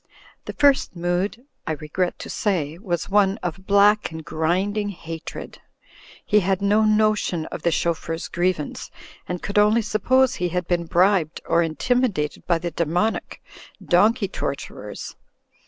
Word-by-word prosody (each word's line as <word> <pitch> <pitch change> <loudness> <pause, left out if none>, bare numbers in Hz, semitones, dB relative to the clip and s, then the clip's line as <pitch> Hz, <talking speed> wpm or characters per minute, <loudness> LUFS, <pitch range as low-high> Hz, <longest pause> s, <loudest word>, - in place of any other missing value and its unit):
The - - -5
First 280 -8 +3
Mood, 175 +7 -2 0.2
I 160 - 0
regret 160 +4 -2
to - - -8
say, 170 -6 -1
was 175 -4 -2
one 200 0 +3
of 180 +2 -5
black 205 +1 +4
and 160 -1 -8
grinding 190 +6 0
hatred. 165 -4 -8 0.6
He 210 - +4
had 190 -1 0
no 205 +2 +3
notion 215 -6 +2
of - - -5
the 170 - +2
chauf 170 0 0
feur's 165 0 -4
grievance, 175 -4 -2 0.4
and 180 -1 -4
could 200 +1 +1
only 215 +2 +4
suppose 255 +5 +2
he 180 -8 -2
had 180 0 -2
been 175 -1 0
bribed 180 -2 +2
or 170 - +3
intimidated 170 -1 -1
by 170 - +3
the 170 +1 -4
demonic 170 +7 -1 0.4
donkey 210 +5 +3
tor 140 -6 -3
turers. 105 -6 -8
185 Hz, 150 wpm, -23 LUFS, 170-210 Hz, 0.6 s, black